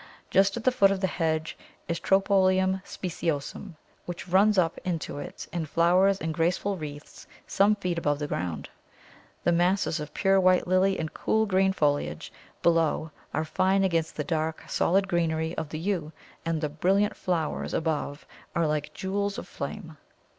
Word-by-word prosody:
Just 195 Hz, +2 st, +3 dB
at 235 Hz, -, -5 dB
the 255 Hz, -, +4 dB
foot 200 Hz, -6 st, +5 dB
of 195 Hz, -1 st, 0 dB
the 190 Hz, -, +1 dB
hedge 160 Hz, -3 st, -1 dB, 0.3 s
is 170 Hz, -1 st, -2 dB
Tropæolum 190 Hz, -1 st, +3 dB
speciosum, 170 Hz, 0 st, -4 dB, 0.3 s
which 175 Hz, 0 st, -6 dB
runs 200 Hz, +3 st, +4 dB
up 165 Hz, -3 st, +2 dB
into 165 Hz, -5 st, -3 dB
it -, -, -8 dB
and 165 Hz, -4 st, -3 dB
flowers 185 Hz, +4 st, +3 dB
in 160 Hz, -, -2 dB
graceful 175 Hz, +5 st, 0 dB
wreaths 150 Hz, -3 st, -9 dB, 0.2 s
some 205 Hz, +2 st, +3 dB
feet 180 Hz, -4 st, -2 dB
above 145 Hz, -3 st, 0 dB
the 150 Hz, -, -3 dB
ground. 90 Hz, -, -3 dB, 0.8 s
The 175 Hz, -, +3 dB
masses 175 Hz, -1 st, +2 dB
of 150 Hz, 0 st, -7 dB
pure 195 Hz, -1 st, +3 dB
white 185 Hz, -1 st, +4 dB
lily 185 Hz, +2 st, +2 dB
and 160 Hz, -1 st, -4 dB
cool 220 Hz, 0 st, +1 dB
green 190 Hz, -1 st, +3 dB
foliage 145 Hz, -, -1 dB, 0.3 s
below 165 Hz, -2 st, +2 dB, 0.2 s
are 160 Hz, -, -1 dB
fine 190 Hz, +4 st, +2 dB
against 165 Hz, -4 st, 0 dB
the -, -, -2 dB
dark, 160 Hz, -2 st, -2 dB
solid 195 Hz, +3 st, +2 dB
greenery 165 Hz, -2 st, 0 dB
of 160 Hz, -2 st, -4 dB
the 155 Hz, -, -5 dB
Yew, 165 Hz, -3 st, -2 dB, 0.4 s
and 165 Hz, -2 st, 0 dB
the 150 Hz, -, -1 dB
brilliant 190 Hz, +7 st, +1 dB
flowers 165 Hz, -4 st, -2 dB
above 150 Hz, -3 st, -2 dB, 0.3 s
are 170 Hz, -, +2 dB
like 150 Hz, -1 st, 0 dB
little -, -, -21 dB
jewels 200 Hz, +1 st, -2 dB
of -, -, -7 dB
flame. 165 Hz, -7 st, -7 dB
175 Hz, 170 wpm, -27 LUFS, 160-195 Hz, 0.8 s, foot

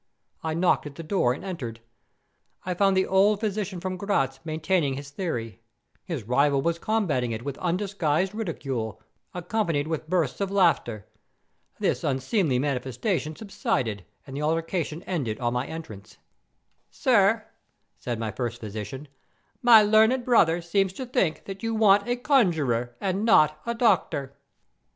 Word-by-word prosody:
I 160 Hz, -1 st, -2 dB
knocked 170 Hz, -3 st, +2 dB
at 140 Hz, -, -10 dB
the 165 Hz, -, -7 dB
door 155 Hz, -7 st, +1 dB
and 140 Hz, +9 st, -5 dB
entered. 125 Hz, -12 st, -5 dB, 0.9 s
I 180 Hz, -, -1 dB
found 195 Hz, +1 st, +2 dB
the 190 Hz, -, +3 dB
old 200 Hz, +2 st, +3 dB
physician 205 Hz, -3 st, -2 dB
from 185 Hz, +1 st, -4 dB
Gratz 135 Hz, -10 st, 0 dB
maintaining 160 Hz, -2 st, 0 dB
his 140 Hz, +1 st, -8 dB
theory. 120 Hz, -, -4 dB, 0.4 s
His 160 Hz, -10 st, -4 dB
rival 140 Hz, +5 st, +2 dB
was 170 Hz, +4 st, 0 dB
combating 170 Hz, -, 0 dB
it 110 Hz, +1 st, -5 dB
with 140 Hz, -1 st, -5 dB
undisguised 185 Hz, -1 st, 0 dB
ridicule, 135 Hz, -, -4 dB, 0.4 s
accompanied 175 Hz, -4 st, -1 dB
with 160 Hz, -1 st, -4 dB
bursts 170 Hz, -3 st, 0 dB
of 200 Hz, -, 0 dB
laughter. 165 Hz, -, +1 dB, 0.7 s
This -, -, 0 dB
unseemly 135 Hz, -, +1 dB
manifestation 140 Hz, -, -2 dB
subsided 120 Hz, -, -2 dB, 0.2 s
and 135 Hz, -, -9 dB
the 145 Hz, -, -3 dB
altercation 165 Hz, +1 st, -1 dB
ended 130 Hz, -12 st, -3 dB
on 120 Hz, -1 st, 0 dB
my 125 Hz, +2 st, -1 dB
entrance. 110 Hz, -11 st, -9 dB, 0.7 s
"'Sir,' -, -, +3 dB, 0.5 s
said 120 Hz, -2 st, -3 dB
my 110 Hz, -1 st, -3 dB
first 120 Hz, +2 st, -4 dB
physician,'my 135 Hz, -, +1 dB
learned 220 Hz, +4 st, +4 dB
brother 175 Hz, -9 st, +3 dB
seems 190 Hz, +2 st, +1 dB
to 260 Hz, -, -6 dB
think 190 Hz, -10 st, 0 dB
that 195 Hz, -1 st, -7 dB
you 225 Hz, 0 st, -2 dB
want 205 Hz, -1 st, +4 dB
a 245 Hz, -, +1 dB
conjuror, 160 Hz, -, +1 dB
and 195 Hz, +1 st, -1 dB
not 155 Hz, -8 st, +4 dB
a 235 Hz, -, -1 dB
doctor. 140 Hz, -, +1 dB
165 Hz, 145 wpm, -26 LUFS, 135-195 Hz, 0.9 s, learned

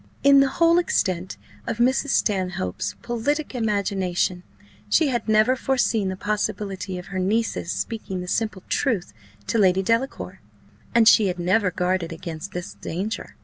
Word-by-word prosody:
In 280 Hz, 0 st, +7 dB
the 275 Hz, -, +5 dB
whole 335 Hz, +4 st, +4 dB
extent 185 Hz, -, -1 dB, 0.3 s
of -, -, -2 dB
Mrs. 260 Hz, +4 st, +2 dB
Stanhope's 185 Hz, -, -1 dB
politic 285 Hz, +6 st, -1 dB
imagination, 195 Hz, -6 st, 0 dB, 0.5 s
she 315 Hz, +6 st, +3 dB
had 240 Hz, -3 st, -2 dB
never 215 Hz, +4 st, +4 dB
foreseen 240 Hz, -6 st, +1 dB
the 190 Hz, -, -3 dB
possibility 200 Hz, -2 st, -3 dB
of 180 Hz, -, -8 dB
her 185 Hz, -, -1 dB
niece's 205 Hz, -2 st, 0 dB
speaking 215 Hz, -5 st, -4 dB
the 180 Hz, -, -6 dB
simple 215 Hz, -1 st, -2 dB
truth 210 Hz, -, -1 dB, 0.3 s
to 230 Hz, -, 0 dB
Lady 190 Hz, -1 st, +4 dB
Delacour, 230 Hz, +6 st, -1 dB, 0.5 s
and 230 Hz, -2 st, +6 dB
she 215 Hz, -2 st, +7 dB
had 180 Hz, -1 st, -2 dB
never 185 Hz, +3 st, +2 dB
guarded 180 Hz, -1 st, -1 dB
against 165 Hz, +2 st, -7 dB
this 180 Hz, 0 st, -6 dB
danger. 195 Hz, +7 st, -5 dB
205 Hz, 145 wpm, -23 LUFS, 185-235 Hz, 0.5 s, In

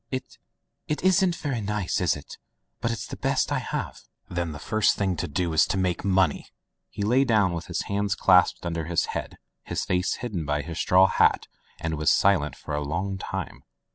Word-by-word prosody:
"It 130 Hz, -1 st, -6 dB, 0.2 s
— -, -, -53 dB
it 150 Hz, -, -1 dB
isn't 185 Hz, -1 st, +3 dB
very 135 Hz, -8 st, -3 dB
nice, 105 Hz, -4 st, -1 dB
is 90 Hz, -, +2 dB
it? 75 Hz, -, -11 dB, 0.4 s
But 115 Hz, -, -1 dB
it's 115 Hz, -2 st, -3 dB
the -, -, -7 dB
best -, -, 0 dB
I -, -, +1 dB
have." -, -, -4 dB, 0.3 s
"Then 85 Hz, -2 st, -3 dB
the 75 Hz, -, -7 dB
first 110 Hz, +8 st, +2 dB
thing 95 Hz, -3 st, 0 dB
to -, -, -2 dB
do 85 Hz, +2 st, -1 dB
is 80 Hz, -, +4 dB
to -, -, -1 dB
make 90 Hz, -2 st, 0 dB
money!" 95 Hz, -5 st, +1 dB, 0.4 s
He 100 Hz, -, -5 dB
lay 125 Hz, +6 st, +4 dB
down 105 Hz, -8 st, +2 dB
with 85 Hz, 0 st, -5 dB
his 90 Hz, -, -2 dB
hands 100 Hz, -1 st, -1 dB
clasped 90 Hz, -1 st, +4 dB
under 85 Hz, -2 st, -2 dB
his 85 Hz, +1 st, +1 dB
head, -, -, -5 dB, 0.2 s
his -, -, -3 dB
face 90 Hz, 0 st, 0 dB
hidden 105 Hz, -9 st, -4 dB
by 75 Hz, 0 st, -1 dB
his 85 Hz, -1 st, -6 dB
straw 95 Hz, +1 st, +5 dB
hat, 95 Hz, -, +3 dB, 0.3 s
and 80 Hz, -2 st, -3 dB
was 75 Hz, -, +3 dB
silent 90 Hz, -7 st, +3 dB
for 75 Hz, -, -8 dB
a 75 Hz, -, -1 dB
long 95 Hz, +6 st, -3 dB
time. -, -, -5 dB
95 Hz, 205 wpm, -26 LUFS, 85-105 Hz, 0.4 s, straw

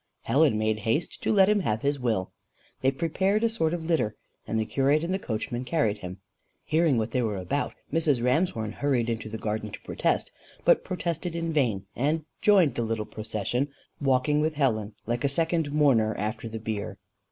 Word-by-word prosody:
Helen 135 Hz, -1 st, +3 dB
made 110 Hz, 0 st, 0 dB
haste 115 Hz, +10 st, -1 dB
to -, -, +1 dB
let 195 Hz, -3 st, +6 dB
him 210 Hz, 0 st, +3 dB
have 110 Hz, -, -1 dB
his 140 Hz, 0 st, +1 dB
will. 110 Hz, -7 st, -1 dB, 0.5 s
They 130 Hz, -, +4 dB
prepared 190 Hz, +9 st, 0 dB
a 230 Hz, -, +4 dB
sort 190 Hz, -9 st, 0 dB
of 170 Hz, -1 st, -3 dB
litter, 155 Hz, -11 st, +1 dB, 0.3 s
and 110 Hz, -, 0 dB
the 110 Hz, -, 0 dB
curate 140 Hz, +6 st, +2 dB
and 175 Hz, +2 st, -1 dB
the 190 Hz, -, 0 dB
coachman 120 Hz, -, -3 dB
carried 125 Hz, -6 st, 0 dB
him. 90 Hz, +1 st, -7 dB, 0.5 s
Hearing 160 Hz, -4 st, +3 dB
what 110 Hz, -1 st, -1 dB
they 125 Hz, -, +1 dB
were 110 Hz, -4 st, -1 dB
about, 95 Hz, +10 st, -2 dB, 0.2 s
Mrs. 155 Hz, -5 st, +2 dB
Ramshorn 125 Hz, -, +1 dB
hurried 120 Hz, -2 st, 0 dB
into 110 Hz, -1 st, -4 dB
the 110 Hz, -, -5 dB
garden 110 Hz, 0 st, -3 dB
to -, -, -9 dB
protest, -, -, -1 dB, 0.3 s
but -, -, +5 dB
protested 170 Hz, -1 st, -3 dB
in 165 Hz, -1 st, -2 dB
vain, 115 Hz, -10 st, +1 dB
and 150 Hz, +4 st, 0 dB, 0.2 s
joined 190 Hz, -, +5 dB
the 120 Hz, -, -2 dB
little 110 Hz, -1 st, -2 dB
procession, 110 Hz, +6 st, -2 dB, 0.3 s
walking 135 Hz, +2 st, +2 dB
with 155 Hz, 0 st, 0 dB
Helen, 110 Hz, -7 st, 0 dB
like 120 Hz, +3 st, -2 dB
a 140 Hz, -, +3 dB
second 160 Hz, 0 st, 0 dB
mourner, 130 Hz, -8 st, +3 dB
after 110 Hz, +2 st, -3 dB
the 110 Hz, -, -5 dB
bier. 110 Hz, -2 st, -4 dB
130 Hz, 190 wpm, -27 LUFS, 110-160 Hz, 0.5 s, let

